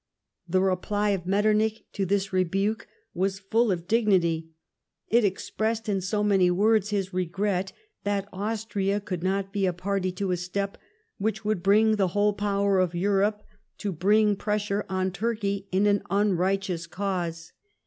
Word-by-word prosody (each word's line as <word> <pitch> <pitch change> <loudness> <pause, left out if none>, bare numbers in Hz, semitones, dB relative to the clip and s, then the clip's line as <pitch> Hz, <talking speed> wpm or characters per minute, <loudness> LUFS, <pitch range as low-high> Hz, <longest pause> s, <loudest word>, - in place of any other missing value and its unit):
The 185 +2 +3
reply 205 +2 0
of 180 -3 -2
Metternich 215 +2 +2
to 195 -2 -1
this 195 0 0
rebuke 195 +5 0 0.3
was 190 +2 0
full 215 +3 +1
of 175 -2 -3
dignity. 180 -8 +2 0.6
It 235 +1 +4
expressed 220 +3 -1
in 195 -2 0
so 205 +3 -1
many 195 -3 +4
words, 210 +3 +3
his 195 -2 -2
regret 185 +1 -1 0.3
that 200 -1 -1
Austria 205 -1 -1
could 185 -4 -5
not 195 +1 -1
be 200 -2 +1
a 180 - 0
party 185 +1 -1
to 190 0 -2
a 180 - +1
step 195 +3 -3 0.4
which 215 +1 -2
would 215 -4 0
bring 215 +3 +4
the 195 -2 +2
whole 205 0 +3
power 200 -1 +1
of 180 -2 +1
Europe 200 +3 +1 0.3
to 205 - -3
bring 205 +5 +3
pressure 205 0 -1
on 185 0 0
Turkey 200 -1 -2
in 190 +2 +2
an 205 -1 +3
unrighteous 190 -3 0
cause. 175 -3 -3
200 Hz, 155 wpm, -26 LUFS, 185-210 Hz, 0.6 s, It